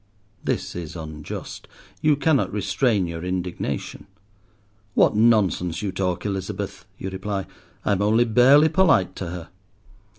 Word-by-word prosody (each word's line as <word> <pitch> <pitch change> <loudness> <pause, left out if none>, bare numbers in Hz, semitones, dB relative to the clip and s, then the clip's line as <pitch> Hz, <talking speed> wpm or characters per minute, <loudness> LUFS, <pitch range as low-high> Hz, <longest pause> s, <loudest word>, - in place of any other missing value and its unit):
This - - -2
is 85 -1 -6
unjust. 80 -2 -7 0.3
You 150 -1 +4
cannot 145 -1 +2
restrain 105 0 +1
your 85 0 -5
indignation. 90 -7 -4 0.9
"What - - +4
nonsense 105 -6 +2
you 100 - -1
talk, 90 -1 -2
Elizabeth," 95 -3 -4
you 95 - -5
reply; 95 +1 -3 0.4
"I - - +2
am 100 -1 +1
only 110 +4 +4
barely 130 +7 +6
polite 160 - +3
to 95 - -4
her." 85 -1 -7
95 Hz, 130 wpm, -23 LUFS, 90-115 Hz, 0.9 s, barely